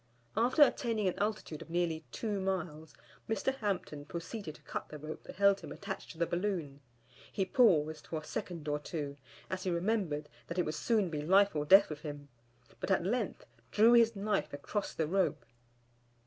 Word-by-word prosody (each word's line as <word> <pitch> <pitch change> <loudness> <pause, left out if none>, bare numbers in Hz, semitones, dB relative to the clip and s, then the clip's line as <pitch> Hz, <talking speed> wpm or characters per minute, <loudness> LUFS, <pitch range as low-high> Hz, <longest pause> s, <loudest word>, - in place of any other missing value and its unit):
After 245 +7 +5
attaining 230 -7 +1
an 185 - -1
altitude 205 -7 -2
of - - -10
nearly 165 -2 0
two 210 -3 -2
miles, 160 -6 -3 0.3
Mr. 220 +5 +1
Hampton 185 - -2
proceeded 170 +2 -6
to - - -18
cut - - -5
the 150 - -7
rope 155 +1 -7
that - - -9
held 200 0 +4
him - - -9
attached 200 -1 -6
to 165 - -10
the 170 - +2
balloon. 170 -6 -2 0.5
He 195 - 0
paused 160 -10 +3
for 160 - -3
a - - -13
second 165 -3 -5
or 150 0 0
two, 145 -2 -5 0.3
as 185 0 -3
he 185 - -1
remembered 170 -5 0 0.2
that 170 - -5
it 180 - +2
would 155 - -2
soon 205 0 +1
be 150 -2 -2
life 195 +4 +4
or 150 -1 0
death 195 +2 +7
with 150 -1 -6
him, 145 -2 -7 0.5
but - - -4
at 190 -2 +2
length 220 +1 -1 0.2
drew 225 +3 +6
his 230 -1 +6
knife 205 +1 -1
across 195 +8 -3
the 160 - +1
rope. 180 -2 0
180 Hz, 190 wpm, -33 LUFS, 155-205 Hz, 0.5 s, death